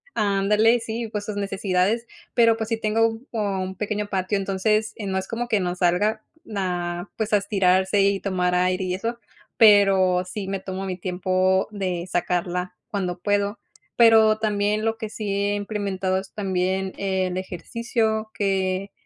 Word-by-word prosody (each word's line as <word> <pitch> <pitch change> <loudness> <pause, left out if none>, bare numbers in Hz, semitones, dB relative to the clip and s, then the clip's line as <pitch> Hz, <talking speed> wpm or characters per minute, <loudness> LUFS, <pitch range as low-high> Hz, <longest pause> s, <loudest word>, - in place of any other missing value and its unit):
Ándale, 210 +3 +3
sí, 230 0 -4
pues, 210 -1 -3
sus 215 - -4
necesidades. 195 +2 0 0.3
Pero, 230 -2 +5
pues 220 -1 -4
sí 225 - 0
tengo 225 +1 +1
como 200 -4 -1
un 190 0 -5
pequeño 210 +1 -2
patio, 195 +1 0
entonces, 210 +3 0
eh, 210 - -5
no 190 -1 -1
es 190 - -6
como 240 +1 -3
que 220 -3 +2
no 180 -2 -1
salga, 200 +5 +1 0.3
ah, 175 -1 -2
pues, 220 -1 -2
a - - +7
estirarse 195 -1 +2
y 200 0 +2
tomar 180 -2 0
aire 185 +1 +1
y 180 -1 -2
eso, 230 +5 -4 0.4
pero 195 -4 +5
sí 195 +1 -6
me 195 0 -2
tomo 190 0 -5
mi 185 -2 -4
tiempo 185 +1 +1
de 185 -4 -3
sacarla 180 +1 -1 0.2
cuando 180 -4 -2
puedo. 205 +2 0 0.4
Pero 220 -2 +6
también 210 0 0
lo 225 0 0
que 220 -2 -5
sí 210 -1 -5
he 200 +1 0
implementado 200 -2 -2
es 190 0 -10
también 190 -1 -1
el 190 -2 -1
ejercicio, 220 +4 -2
que, 195 -1 -1
195 Hz, 165 wpm, -24 LUFS, 185-215 Hz, 0.4 s, a